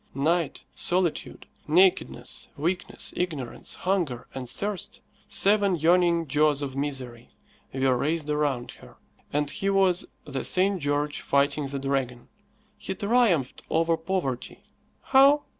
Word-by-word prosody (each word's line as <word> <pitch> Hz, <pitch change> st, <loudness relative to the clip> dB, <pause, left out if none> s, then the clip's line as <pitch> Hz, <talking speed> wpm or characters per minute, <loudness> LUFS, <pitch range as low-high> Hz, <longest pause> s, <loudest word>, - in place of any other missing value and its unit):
Night, 165 Hz, +4 st, 0 dB
solitude, 175 Hz, -2 st, -1 dB, 0.2 s
nakedness, 180 Hz, +4 st, +2 dB
weakness, 175 Hz, +5 st, -3 dB
ignorance, 155 Hz, -9 st, -4 dB
hunger, 175 Hz, -11 st, -1 dB
and 130 Hz, -2 st, -6 dB
thirst 205 Hz, -2 st, -3 dB, 0.3 s
seven 200 Hz, -1 st, +3 dB
yawning 170 Hz, +1 st, +3 dB
jaws 150 Hz, 0 st, +2 dB
of 135 Hz, -2 st, -5 dB
misery 130 Hz, -4 st, -5 dB, 0.4 s
were 130 Hz, -1 st, +2 dB
raised 155 Hz, +4 st, -1 dB
around 145 Hz, -5 st, -1 dB
her, -, -, -16 dB, 0.3 s
and 145 Hz, 0 st, 0 dB
he 195 Hz, -, -2 dB
was 190 Hz, -2 st, +2 dB, 0.2 s
the 140 Hz, -2 st, -4 dB
St. 190 Hz, 0 st, +2 dB
George 145 Hz, +1 st, -1 dB
fighting 140 Hz, +1 st, +1 dB
the 140 Hz, +1 st, -3 dB
dragon. 135 Hz, -3 st, -2 dB, 0.5 s
He 205 Hz, -, -4 dB
triumphed 200 Hz, -, +1 dB
over 165 Hz, +1 st, +2 dB
poverty. 160 Hz, -7 st, -3 dB, 0.4 s
How? 280 Hz, +2 st, +5 dB
155 Hz, 120 wpm, -26 LUFS, 140-185 Hz, 0.5 s, How